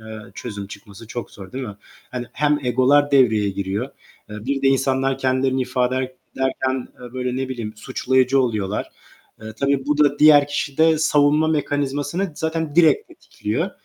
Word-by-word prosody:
eee, 110 -1 -9
çözüm 105 -4 -6
çıkması 100 +2 -12
çok 120 -2 -6
zor 95 -2 -12
değil 130 0 -4
mi? 100 -1 -8 0.3
Hani, 125 -1 -5
hem 150 0 +1
egolar 135 +4 +3
devreye 110 -7 +4
giriyor. 100 +6 -3 0.4
Eee, 105 - -6
bir 140 0 -1
de 135 - +4
insanlar 135 0 +1
kendilerini 130 0 +1
ifade 125 0 0
er 130 0 -2 0.2
ederken, 130 -1 -1
eee, 125 -1 -10
böyle, 125 -1 -3
ne 130 0 -2
bileyim, 115 -4 -5
suçlayıcı 130 +2 +1
oluyorlar. 105 -5 -1 0.5
Eee, 110 0 -7
tabii 140 -1 +1
bu 150 0 +1
da 145 -1 +3
diğer 150 -2 +7
kişide 155 +2 +1
savunma 150 +1 +3
mekanizmasını 145 +4 -1
zaten 160 -1 -3
direkt 175 - +4
tetikliyor. 340 - -4
130 Hz, 160 wpm, -21 LUFS, 120-145 Hz, 0.5 s, diğer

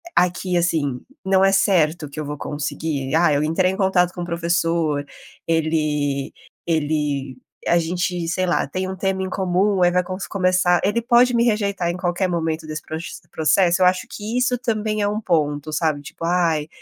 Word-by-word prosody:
aqui 180 0 +1
assim, 155 -7 0 0.2
não 190 0 +3
é 195 - +4
certo 165 -6 +2
que 155 - -8
eu 150 - -3
vou 145 0 -5
conseguir: 145 -1 -3
"Ah, 165 -2 +4
eu 145 - +1
entrei 185 +4 +1
em 190 - -5
contato 185 -2 +2
com 175 - -6
o - - -3
professor, 170 -3 0 0.4
ele 150 -4 0 0.3
ele 145 -5 -1 0.3
a 175 - +4
gente, 175 0 -2
sei 185 +1 0
lá, 175 - +1
tem 185 +5 -3
um 190 - -4
tema 190 0 -1
em 190 - -3
comum, 190 +1 +1
aí 175 - +4
vai 180 0 +2
consu 185 -2 -5
começar". 185 -2 +2
Ele 220 +4 +1
pode 240 +1 +4
me 235 - +3
rejeitar 200 -5 0
em 175 - -3
qualquer 180 +1 0
momento 160 -2 -2
desse 155 0 -5
proxe 160 +1 -7
processo? 175 +3 +2
Eu - - +6
acho 180 0 +2
que 220 +4 -5
isso 250 0 +2
também 215 -3 -1
é 205 - +1
um 210 +1 -1
ponto, 150 -4 0
sabe? 155 -2 0
Tipo: 165 +3 -8
"Ai, 165 -3 +1
175 Hz, 190 wpm, -21 LUFS, 155-190 Hz, 0.4 s, Eu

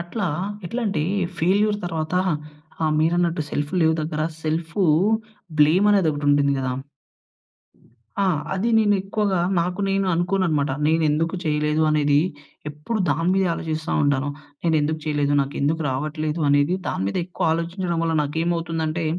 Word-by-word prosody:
అట్లా 185 +4 -3 0.4
ఎట్లంటే 210 -5 -1 0.4
ఫెయిల్యూర్ 205 +5 +2
తర్వాత 160 0 -3 0.7
ఆహ్, 155 -1 +2
మీరన్నట్టు 170 0 +1
సెల్ఫ్ 145 +2 -2
లేవ్ 160 0 +4
దగ్గర 155 0 -2 0.2
సెల్ఫూ 165 +4 -1 0.8
బ్లేమ్ 170 +8 +5
అనేదొకటుంటుంది 145 -6 +2
గదా! 130 -1 -2 1.5
ఆ! 200 - +3 0.3
అది 200 +5 0
నేను 205 -2 +3
ఎక్కువగా 200 -1 0 0.2
నాకు 180 +3 -1
నేను 195 0 +1
అనుకోననమాట. 175 -5 +1 0.2
నేనెందుకు 160 +1 +1
చేయలేదు 150 0 +1
అనేది 145 -1 +3 0.5
ఎప్పుడు 150 +10 -4
దాని 165 +4 0
మీదే 190 -1 +2
ఆలోజిస్తా 160 0 -3
ఉంటాను. 145 -1 +1 0.3
నేనెందుకు 155 -2 +1
చేయలేదు 145 -2 0
నాకెందుకు 145 +3 -1
రావట్లేదు 155 +4 -2
అనేది 145 +5 +3
దాని - - -2
మీద - - -4
ఎక్కువ 180 - -4
ఆలోజించడం 170 +1 -2
వల్ల 165 -1 0
నాకేమవుతుందంటే, 165 +1 -2
160 Hz, 120 wpm, -23 LUFS, 150-180 Hz, 1.5 s, బ్లేమ్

